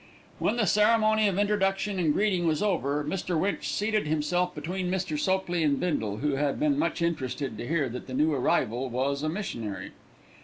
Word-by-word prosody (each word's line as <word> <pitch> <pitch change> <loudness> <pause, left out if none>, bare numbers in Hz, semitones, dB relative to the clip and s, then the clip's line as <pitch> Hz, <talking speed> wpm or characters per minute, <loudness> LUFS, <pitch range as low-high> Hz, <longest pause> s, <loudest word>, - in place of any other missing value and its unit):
When - - +1
the 235 -3 +1
ceremony 215 +2 +4
of 195 -2 0
introduction 200 -1 +1
and 160 -4 +2
greeting 185 -1 +1
was 155 +4 +1
over, 150 -8 0
Mr. 175 +1 -2
Winch 200 +4 -1
seated 210 -4 0
himself 155 +4 0
between 180 +5 -3
Mr. 185 -3 -1
Sopley 175 +1 0
and 145 -2 +2
Bindle, 110 - -1
who 140 +2 0
had 145 0 0
been 295 -1 +2
much 240 - 0
interested 130 -6 -2
to 120 - -5
hear 155 -3 +1
that 125 +1 -7
the 130 - -5
new 155 +3 +2
arrival 125 -1 0
was 135 +3 -1
a 155 - -1
missionary. 115 - -5
170 Hz, 185 wpm, -27 LUFS, 140-195 Hz, -, ceremony